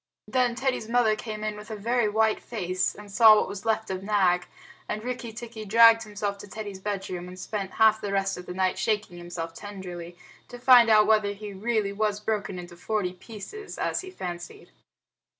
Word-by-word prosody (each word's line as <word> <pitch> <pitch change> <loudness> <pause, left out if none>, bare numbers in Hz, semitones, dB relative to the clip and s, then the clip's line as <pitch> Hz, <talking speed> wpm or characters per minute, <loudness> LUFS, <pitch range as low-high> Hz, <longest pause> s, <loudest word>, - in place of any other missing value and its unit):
Then 250 -2 +1
Teddy's 260 -4 -1
mother 235 -2 +3
came 215 -1 -6
in 215 0 -2
with 210 +1 -11
a 220 - -4
very 230 +1 +1
white 220 +1 +2
face, 185 -5 -2
and 205 -1 -12
saw 220 +1 +8
what - - +2
was 200 +2 -7
left 220 -2 0
of 190 0 -3
Nag, 190 -3 +2 0.4
and 215 - -3
Rikki 245 -1 -4
tikki 225 -1 -8
dragged 230 +2 +7
himself 205 -2 -4
to - - -10
Teddy's 205 -1 -7
bedroom 190 -3 -4
and 180 0 -10
spent 195 0 -4
half 220 -1 +4
the 200 - -3
rest 195 0 0
of 180 - -10
the 180 - -5
night 185 0 0
shaking 210 -5 -1
himself 170 -1 -6
tenderly 180 -3 -8 0.3
to 245 - -9
find 245 -2 +7
out 215 -1 +6
whether 215 -1 +3
he 205 0 -8
really 210 0 -1
was 210 0 0
broken 210 -3 -2
into 175 -1 -9
forty 185 0 -2
pieces, 225 - -9
as - - -1
he 375 - -9
fancied. 175 - -7
210 Hz, 195 wpm, -26 LUFS, 190-220 Hz, 0.4 s, saw